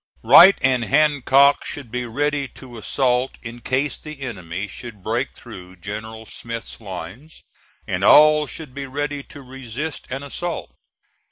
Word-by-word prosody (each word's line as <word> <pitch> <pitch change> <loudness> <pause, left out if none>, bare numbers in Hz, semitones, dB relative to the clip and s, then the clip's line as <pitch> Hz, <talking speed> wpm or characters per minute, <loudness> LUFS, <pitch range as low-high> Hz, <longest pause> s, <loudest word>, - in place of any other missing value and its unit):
Wright 170 - +9
and 130 -2 +3
Hancock 140 0 +4
should 135 -6 -6
be 125 0 -3
ready 145 +3 -1
to 125 -3 -12
assault 125 +2 0
in 120 0 -8
case 130 +4 -1
the 155 -2 -10
enemy 100 -6 -5
should 105 -2 -10
break - - -2
through 90 0 -12
General 110 +5 -7
Smith's 115 +1 -7
lines, 105 - -9 0.4
and - - -3
all 150 0 +7
should 145 +1 -8
be 140 0 -6
ready 145 +1 -3
to 140 0 -13
resist 135 +3 -6
an 135 +2 -4
assault. 175 +4 -5
130 Hz, 145 wpm, -21 LUFS, 115-145 Hz, 0.4 s, Wright